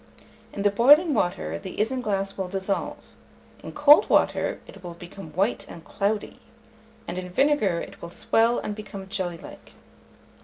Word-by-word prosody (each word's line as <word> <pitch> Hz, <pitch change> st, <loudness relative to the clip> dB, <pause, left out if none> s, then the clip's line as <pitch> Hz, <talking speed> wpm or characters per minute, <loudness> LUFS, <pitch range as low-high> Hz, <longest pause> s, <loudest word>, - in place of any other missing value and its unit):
In 200 Hz, -, -5 dB
the 205 Hz, -, +4 dB
boiling 290 Hz, -, +6 dB
water 85 Hz, -, -1 dB
the -, -, -8 dB
isinglass 210 Hz, -4 st, -1 dB
will 190 Hz, -2 st, -3 dB
dissolve, 195 Hz, +1 st, -3 dB, 0.6 s
in -, -, -8 dB
cold 295 Hz, +1 st, +6 dB
water -, -, +2 dB
it 195 Hz, -, -14 dB
will 175 Hz, -1 st, -8 dB
become 175 Hz, 0 st, -11 dB
white 195 Hz, +7 st, 0 dB
and 165 Hz, -, -11 dB
"cloudy," 205 Hz, +1 st, -2 dB, 0.7 s
and 180 Hz, -, -4 dB
in 180 Hz, 0 st, -7 dB
vinegar 215 Hz, -, +2 dB
it -, -, -9 dB
will 170 Hz, -, -7 dB
swell 225 Hz, +6 st, +1 dB
and 210 Hz, -, -3 dB
become 200 Hz, -2 st, -9 dB
jelly 185 Hz, -4 st, -3 dB
like. -, -, -13 dB
200 Hz, 155 wpm, -25 LUFS, 180-225 Hz, 0.7 s, boiling